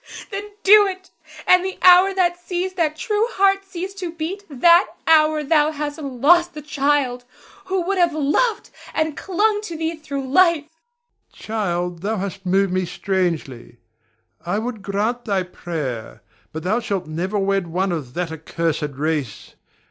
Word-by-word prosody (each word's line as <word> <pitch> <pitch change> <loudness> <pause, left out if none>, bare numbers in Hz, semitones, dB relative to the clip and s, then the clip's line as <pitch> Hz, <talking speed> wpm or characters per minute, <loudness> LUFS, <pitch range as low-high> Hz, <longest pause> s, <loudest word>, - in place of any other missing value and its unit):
Then 405 +1 -5
do 410 +1 +7
it; 375 -1 -7 0.3
and 365 0 +5
the 380 0 -4
hour 365 +1 +7
that 350 -2 +1
sees 365 +1 -3
that 320 -4 0
true 425 +6 0
heart 390 0 +3
cease 380 0 -6
to 370 -4 -5
beat, 335 +5 -5
that 340 +6 +5 0.2
hour 310 -1 +4
thou 300 +1 +3
hast 295 0 -5
lost 300 +6 +3
the 300 - -6
child 280 -4 0 0.4
who 380 -1 -1
would 385 +2 -1
have 345 -1 +4
loved 310 - 0 0.2
and 315 -1 0
clung 415 +4 0
to 345 -6 -6
thee 325 +1 -2
through 280 -4 -5
life. 335 +2 +4
Ber. 480 +11 -40
Child, 180 -5 -3
thou 215 +3 -1
hast 195 0 -5
moved 195 0 +2
me 185 0 +1
strangely. 170 - -3 0.7
I 180 +4 -1
would 225 -1 -4
grant 210 +5 -2
thy 200 -4 0
prayer, 155 -10 -6 0.3
but 160 +1 -6
thou 210 +6 +1
shalt 200 -6 -3
never 175 +7 -3
wed 195 -2 0
one 185 +3 -1
of 140 -7 -5
that 175 -2 -2
accursed 160 -2 -3
race. 150 -5 -3
290 Hz, 160 wpm, -21 LUFS, -, 0.7 s, do